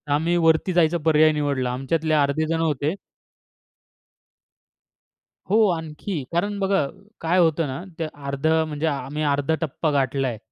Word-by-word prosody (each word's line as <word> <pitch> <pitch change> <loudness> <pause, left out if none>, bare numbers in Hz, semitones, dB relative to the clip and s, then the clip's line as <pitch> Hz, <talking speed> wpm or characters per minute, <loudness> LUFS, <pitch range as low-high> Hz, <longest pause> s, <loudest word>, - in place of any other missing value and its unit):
आम्ही 165 +4 +1
वरती 165 +2 +2
जायचा 170 -1 +3
पर्याय 155 0 +5
निवडला. 140 -4 -1
आमच्यातले 155 +5 -1
अर्धे 145 +1 +2
जण 165 0 -1
होते 150 -1 0 2.6
हो, 215 +1 +4
आणखी. 160 0 -4
कारण 200 +5 -1
बघा, 195 -5 +1 0.4
काय 170 +3 +2
होतं 165 -2 +2
ना 135 +5 -5 0.2
ते 165 - -1
अर्धं 145 +3 0
म्हणजे 150 +1 -3
आम्ही 150 +1 -3
अर्धा 145 +2 +1
टप्पा 155 0 -1
गाठला 135 -1 0
आहे. 115 -3 -3
155 Hz, 135 wpm, -23 LUFS, 140-165 Hz, 2.6 s, पर्याय